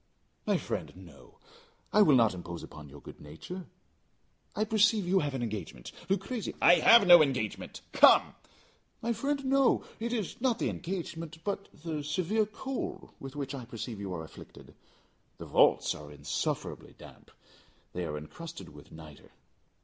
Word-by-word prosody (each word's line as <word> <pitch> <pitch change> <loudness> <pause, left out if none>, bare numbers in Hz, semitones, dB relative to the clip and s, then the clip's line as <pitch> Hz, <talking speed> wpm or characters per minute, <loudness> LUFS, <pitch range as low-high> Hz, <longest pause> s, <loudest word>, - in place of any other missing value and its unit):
"My - - +3
friend, - - -4
no; 85 -8 -15 0.6
I 210 - +6
will 155 -9 +6
not 115 -5 +4
impose 85 -1 -7
upon 75 -2 -11
your 70 +1 -13
good - - -12
nature. 125 - -9 0.9
I 215 - +1
perceive 215 -2 +3
you 190 +2 +3
have 145 -4 -2
an 125 - -2
engagement. 95 - -6 0.2
Luchesi 200 +3 -2
" - - -25
"I - - +5
have 230 -3 +7
no 175 -2 +9
engagement; 125 -8 -2
come." - - +6 0.7
"My 235 +1 +1
friend, 275 +4 -2
no. 270 0 +3 0.2
It 235 +1 -3
is 225 -2 -3
not 250 -3 +2
the - - -1
engagement, 165 -3 -5
but 200 0 -3
the 155 -1 -5
severe 185 +8 0
cold 260 +5 -5
with 135 +1 -9
which 140 -2 -4
I 135 -3 -6
perceive 115 -2 -7
you 100 -2 -5
are 80 - -5
afflicted. 80 - -13 0.6
The - - -8
vaults - - +3
are 75 -1 -10
insufferably 75 - -4
damp. - - -15 0.6
They 90 - -3
are 75 -1 -4
encrusted 165 - -9
with 75 -1 -15
nitre." 80 -2 -13
155 Hz, 160 wpm, -30 LUFS, -, 0.9 s, no